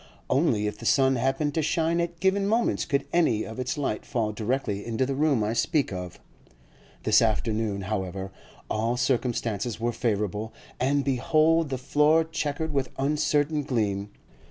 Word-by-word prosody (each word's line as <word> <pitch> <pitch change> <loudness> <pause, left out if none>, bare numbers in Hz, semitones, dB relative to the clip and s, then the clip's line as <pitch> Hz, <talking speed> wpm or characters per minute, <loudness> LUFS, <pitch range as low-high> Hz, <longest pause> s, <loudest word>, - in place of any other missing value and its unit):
Only 130 -8 +2
if 105 - -3
the - - -9
sun 135 -1 +4
happened 135 +4 0
to 160 - +1
shine 165 +2 +1
at 170 0 -4
given 195 +1 +2
moments 225 +3 +1
could 140 - 0
any 120 -11 +3
of 110 +3 -8
its 130 +2 -2
light 135 -7 -2
fall 115 -6 -1
directly 105 -1 -2
into 115 +2 -1
the 135 - -2
room 140 -5 +2
I 105 +2 0
speak 140 - +1
of; 90 -1 -6 0.8
this - - +5
afternoon, 110 -2 0
however, 95 -1 -4 0.4
all 115 +3 -1
circumstances 120 -3 -1
were 120 +1 0
favourable, 105 -2 -2 0.3
and 140 +2 +1
behold 155 +4 +2
the 130 - -2
floor 150 +5 +3
chequered 160 -1 -3
with 135 -2 0
uncertain 150 +1 +1
gleam. 105 -7 -1
130 Hz, 155 wpm, -26 LUFS, 110-150 Hz, 0.8 s, this